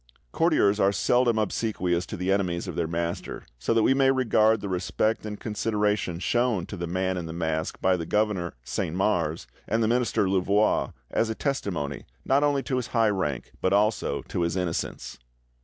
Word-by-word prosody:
Courtiers 100 - +3
are 95 - +4
seldom 120 +3 +2
obsequious 95 -5 -1
to 105 - -6
the 90 +2 -1
enemies 90 -3 0
of - - -5
their 85 - -1
master, 85 +1 -4
so 65 - -1
that 115 -1 +3
we 135 - +4
may 135 0 +3
regard 110 -4 +3
the 100 - -5
respect 105 +4 -1
and 105 -1 -6
consideration 105 -4 -1
shown 120 -1 +1
to - - -7
the 85 0 -4
Man 95 +1 -1
in 85 -2 -4
the 80 - -6
Mask 80 -2 -2
by 95 0 +3
the 85 -2 -4
governor 105 -6 0
Saint 80 +5 -3
Mars, 85 - 0 0.2
and 115 +1 +1
the - - +2
minister 120 -4 +1
Louvois, 100 +3 +2 0.2
as 115 - +1
a 110 - -2
testimony, 100 - -3 0.2
not 140 +2 +3
only 145 -2 +2
to 130 - -1
his 125 -1 -2
high 115 -1 +4
rank, 75 -10 -2
but 95 - +2
also 105 +2 +1
to - - -3
his 85 +1 0
innocence. 90 -8 -3
100 Hz, 190 wpm, -26 LUFS, 85-110 Hz, 0.2 s, are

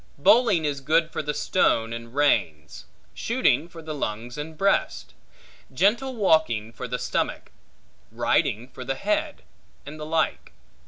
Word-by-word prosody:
Bowling 200 - +4
is 140 -2 -2
good 165 +4 +2
for - - -3
the 150 -1 -2
stone 115 -10 +1
and 115 +1 -8
reins; 80 - 0 0.3
shooting 230 - +1
for 165 -1 -11
the 155 0 -5
lungs 120 -3 -4
and 155 +1 -7
breast; 195 +2 0 0.6
gentle 225 - +1
walking 155 - +2
for 120 - -6
the 125 +1 -2
stomach; - - -2 0.6
riding 115 +4 0
for 130 - -10
the 135 +1 -2
head; 310 - -2 0.4
and 150 +2 -9
the 150 - -5
like. 160 - -1
150 Hz, 145 wpm, -25 LUFS, 125-175 Hz, 0.6 s, Bowling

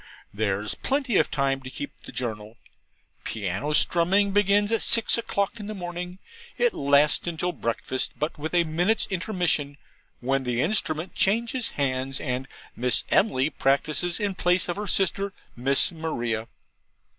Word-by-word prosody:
There's 105 0 0
plenty 270 -5 0
of - - +3
time 135 -1 0
to 130 - -8
keep 145 - -6
the - - -9
Journal. 110 -2 -4 0.7
Piano 100 +7 -3
strumming 185 +6 +3
begins 205 +1 +3
at 225 - +2
six 230 -1 +3
o'clock 225 -1 -1
in 205 - -6
the 215 - -5
morning; 180 0 -5 0.4
it 485 -2 +2
lasts 140 +1 +4
till 175 +1 -2
breakfast, 130 -2 -2
with 150 +2 -1 0.2
but - - -2
a 170 - +5
minute's 175 +7 +1
intermission, 175 -7 0 0.4
when 135 +2 0
the 120 -1 -1
instrument 160 -1 0
changes 230 +4 +1
hands, 135 -1 -1
and 130 0 -3 0.3
Miss 125 +1 +2
Emily 150 -8 +3
practises 150 +7 +1
in 205 -2 0
place 180 0 +2
of 175 - -2
her 210 0 -4
sister 195 +1 0 0.2
Miss 135 +7 +2
Maria. 120 -9 -3
160 Hz, 145 wpm, -26 LUFS, 130-195 Hz, 0.7 s, a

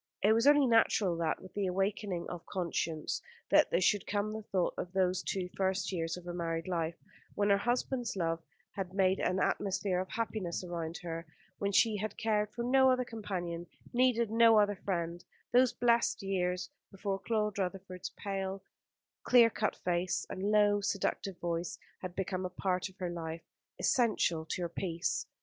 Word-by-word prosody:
It 210 +2 +6
was 230 +4 +3
only 290 -1 +7
natural 225 -6 +3
that, 165 -2 -1
with 185 - -12
the 200 -2 -1
awakening 195 -1 -1
of 175 -2 -7
conscience, 165 -4 -2 0.3
there - - +5
should 200 +2 +2
come 205 +1 -1
the 220 - -4
thought 190 -4 0
of 175 - -5
those 185 -1 +2
two 185 -1 -2
first 190 0 0
years 165 -2 -2
of 180 - -11
her 175 - -5
married 165 -1 -2
life, 165 -2 -1 0.4
when 205 0 +2
her 200 - +6
husband's 245 +1 -1
love 165 -2 -1 0.3
had 190 -2 -5
made 190 -1 +3
an 185 +1 +1
atmosphere 190 -2 0
of 185 - -3
happiness 215 -6 -3
around 170 -2 -4
her, 165 -1 -5 0.3
when 200 0 0
she 215 +1 +4
had 215 +2 -4
cared 210 -2 +1
for 235 +3 -5
no 265 +2 +5
other 255 -1 +2
companion, 175 -7 -4 0.3
needed 240 -3 +3
no 230 -1 +6
other 205 -1 +4
friend; 175 -3 -3 0.3
those 250 0 +5
blessed 235 -3 +2
years 180 -2 -1 0.2
before 195 0 -3
Claude 210 -1 -1
Rutherford's 185 -1 -4
pale, 195 -1 -4 0.6
clear 235 -2 +6
cut 215 - -1
face, 180 0 -1
and 190 +2 -2
low, 205 -1 +4
seductive 195 -1 -1
voice 170 0 -3 0.2
had 180 -1 -6
become 190 -1 -2
a 185 - -2
part 185 +1 -1
of 190 - -20
her 180 -2 -3
life, 165 -1 -5 0.4
essential 200 -9 +2
to 175 +2 -3
her 170 - -2
peace. 170 0 -2
190 Hz, 170 wpm, -32 LUFS, 175-210 Hz, 0.6 s, only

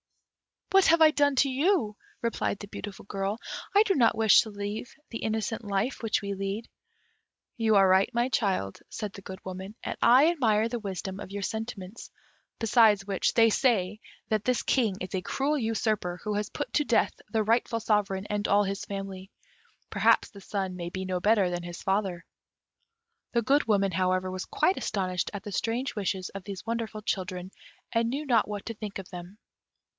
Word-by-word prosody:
"What 390 -1 +6
have 330 0 +5
I 310 -1 +8
done 285 -2 +2
to 275 +1 +3
you," 270 - +1 0.3
replied 230 -3 -1
the 205 - -8
beautiful 200 -1 -8
girl. 195 +1 -2 0.4
"I 410 - +8
do 405 - +2
not 235 - +3
wish 220 -2 +7
to 220 - -6
leave 205 +3 -5 0.2
the 230 - -4
innocent 220 +1 -2
life 205 +6 -1
which 220 -2 0
we 200 0 -2
lead." 195 +3 -4 0.9
"You 220 -2 +3
are 195 -1 +6
right, 190 +1 +4
my 240 +2 +1
child," 190 - 0
said 210 -2 -5
the 200 - -10
Good 190 -1 -9
Woman, 190 +3 -7
"and - - -3
I 265 +7 +6
admire 225 -8 +2
the 240 0 -3
wisdom 190 -2 -5
of 205 - -7
your 200 0 -5
sentiments; 220 -2 -5 0.5
besides 220 -3 +4
which, 195 -2 0
they 225 -1 +6
say 215 -6 +1 0.3
that 215 -2 +1
this 250 -1 +1
King 225 -7 +2
is 185 - -5
a 190 - -1
cruel 280 +10 0
usurper, 215 -6 -1
who 210 - -2
has 210 0 -2
put 290 - -5
to 295 - +2
death 235 - +2 0.2
the 220 -1 +2
rightful 230 +1 +1
sovereign 205 -3 0
and 210 0 -1
all 205 +1 +4
his 195 0 -3
family: 195 -1 -6 0.6
perhaps - - +3
the 200 -4 -13
son 190 -2 -3
may 175 -1 -4
be 190 +1 -5
no 185 -1 -1
better 205 -2 +3
than 175 0 -3
his 175 0 -8
father." 190 -3 -1 1.1
The 235 -1 +2
Good 280 +6 +3
Woman, 200 -3 +2
however, 185 +1 0
was 185 0 -4
quite 375 - +1
astonished 185 -3 -1
at 200 -2 -6
the 205 - -6
strange 235 +6 -1
wishes 190 -2 -2
of 195 -1 -8
these 200 -1 -7
wonderful 225 -2 -3
children, 185 -2 -3 0.4
and 230 0 +1
knew 285 +5 -3
not 235 -6 +3
what 205 -1 -5
to 230 - -3
think 210 -2 -6
of 195 -1 -8
them. 180 +2 -9
210 Hz, 190 wpm, -28 LUFS, 190-230 Hz, 1.1 s, I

